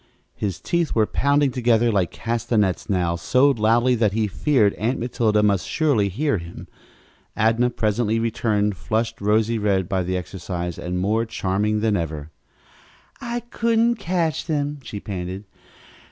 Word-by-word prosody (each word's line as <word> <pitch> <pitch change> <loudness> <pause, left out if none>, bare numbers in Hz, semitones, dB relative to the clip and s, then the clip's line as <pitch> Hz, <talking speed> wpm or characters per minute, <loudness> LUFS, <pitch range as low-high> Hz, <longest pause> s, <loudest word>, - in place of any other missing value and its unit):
His 100 -4 -4
teeth 170 -3 -1
were 110 -2 +4
pounding 140 +3 +2
together 120 -2 +2
like 95 -5 +1
castanets, 110 -3 -1
now, 90 -3 +1
so 125 +12 +3
loudly 120 +1 +2
that 110 -4 +1
he 110 0 +1
feared 105 +1 +2
Aunt 120 +5 -1
Matilda 115 -3 +1
must 100 -3 +1
surely 140 -11 +1
hear 135 - 0
them. 85 0 -10 0.7
Adnah 115 +3 +3
presently 110 +1 0
returned, 105 -3 0
flushed 110 +6 -2
rosy 110 +2 +2
red 95 -3 +1
by 95 0 0
the 90 +1 -1
exercise 90 -1 -5
and 90 +1 -3
more 105 +5 +1
charming 105 0 -1
than 110 -2 +2
ever. 80 -4 -4 0.9
"I 240 0 -3
couldn't 230 0 +2
catch 170 -7 -1
them," 145 -2 -1
she 105 -5 -7
panted. 95 -1 -5
110 Hz, 145 wpm, -22 LUFS, 95-125 Hz, 0.9 s, were